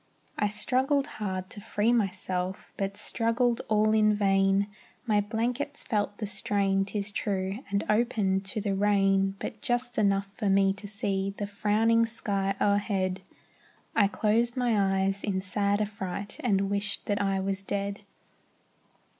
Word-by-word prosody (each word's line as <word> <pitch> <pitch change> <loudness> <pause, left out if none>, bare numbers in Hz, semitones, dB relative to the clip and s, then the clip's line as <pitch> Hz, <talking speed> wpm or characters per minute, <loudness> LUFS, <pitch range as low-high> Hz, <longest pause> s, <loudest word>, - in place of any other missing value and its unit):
I 210 - +1
struggled 265 +6 +1 0.2
hard 185 -2 -2
to 205 - -7
free 210 +3 +1
myself, 190 -4 -2
But 195 0 -3
struggled 235 +1 +1
all 215 0 +3
in 215 -1 +4
vain; 195 -1 +3 0.4
My 210 -3 +3
blankets 245 +7 -2
felt 205 -2 -1
the 215 - -3
strain, 195 -1 +1
'tis 205 0 -3
true, 195 0 -2
And 200 +1 0
opened 210 -4 +1
to 195 +3 -3
the 200 -1 -1
rain, 195 -1 +2
But 210 +2 -6
just 245 -1 -1
enough 200 -1 +2
for 200 +1 -3
me 195 0 +4
to 205 +1 -8
see 195 -1 -2
The 205 - -2
frowning 220 +3 +2
sky 200 -3 -1
o'erhead; 200 -2 +1 0.7
I 205 -3 +5
closed 225 +5 +1
my 200 -6 +2
eyes, 195 +1 -2
in 195 -3 0
sad 200 +2 0
affright, 200 -1 -4
And 200 -4 +1
wished 200 0 -1
that 205 0 0
I 195 -1 +1
was 195 0 -2
dead. 200 +1 -3
200 Hz, 145 wpm, -28 LUFS, 195-215 Hz, 0.7 s, I